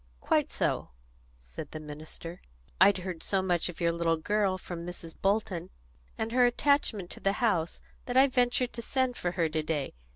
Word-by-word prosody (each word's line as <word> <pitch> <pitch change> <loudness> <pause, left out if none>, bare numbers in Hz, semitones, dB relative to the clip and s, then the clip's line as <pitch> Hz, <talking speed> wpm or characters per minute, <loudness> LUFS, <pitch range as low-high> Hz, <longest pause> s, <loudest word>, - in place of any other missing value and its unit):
"Quite - - +1
so," - - 0 0.5
said - - -9
the 155 - -6
minister. 155 +3 -8 0.4
"I'd 195 +1 +7
heard 180 -3 -5
so 195 -1 0
much 175 -2 +1
of 175 - -8
your 170 -1 +3
little 165 -1 +1
girl 200 +2 +1
from 175 -2 -7
Mrs. 170 -2 -7
Bolton, 195 -3 0 0.5
and 220 +1 -2
her 250 +1 +4
attachment 245 -7 +1
to - - -5
the 195 - +1
house, 200 -9 0 0.3
that 245 0 0
I 265 - +9
ventured 250 -1 +1
to 235 - -4
send 260 +1 0
for 175 -5 -2
her 170 -3 +2
to 155 0 0
day. 150 -3 -2
185 Hz, 185 wpm, -30 LUFS, 165-225 Hz, 0.5 s, I